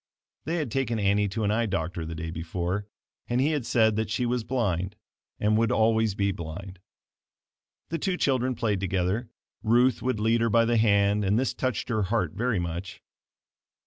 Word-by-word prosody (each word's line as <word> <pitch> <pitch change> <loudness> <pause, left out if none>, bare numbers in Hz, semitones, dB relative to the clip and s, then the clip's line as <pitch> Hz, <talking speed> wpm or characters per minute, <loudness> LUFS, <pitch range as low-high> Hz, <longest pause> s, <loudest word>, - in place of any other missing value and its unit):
They 165 - -1
had 150 -9 -2
taken 120 -3 0
Annie 100 0 +2
to 110 +3 -3
an 105 - +1
eye 115 +1 +1
doctor 85 -3 -3
the 80 - -5
day 80 +1 -5
before 85 +4 -3 0.4
and 120 +1 0
he 145 +4 +3
had 145 -6 -2
said 110 -3 +3
that 110 -1 -1
she 115 +3 0
was 120 -1 0
blind 100 -6 -1 0.4
and 105 +1 +2
would 115 -1 +2
always 110 -1 +2
be 100 -1 +1
blind. 90 +2 -7 1.1
The 165 - -2
two 185 +3 -1
children 130 -4 +1
played 110 -4 0
together. 95 +5 -1 0.3
Ruth 120 +3 +3
would 125 -3 -1
lead 115 +2 +2
her 115 - +2
by 115 +1 +4
the 120 0 +2
hand 100 -1 +3
and 100 +2 +2
this 130 +2 0
touched 130 -3 -2
her 110 -2 +1
heart 95 -4 0
very 115 +2 0
much. 85 +2 -5
110 Hz, 185 wpm, -27 LUFS, 95-120 Hz, 1.1 s, by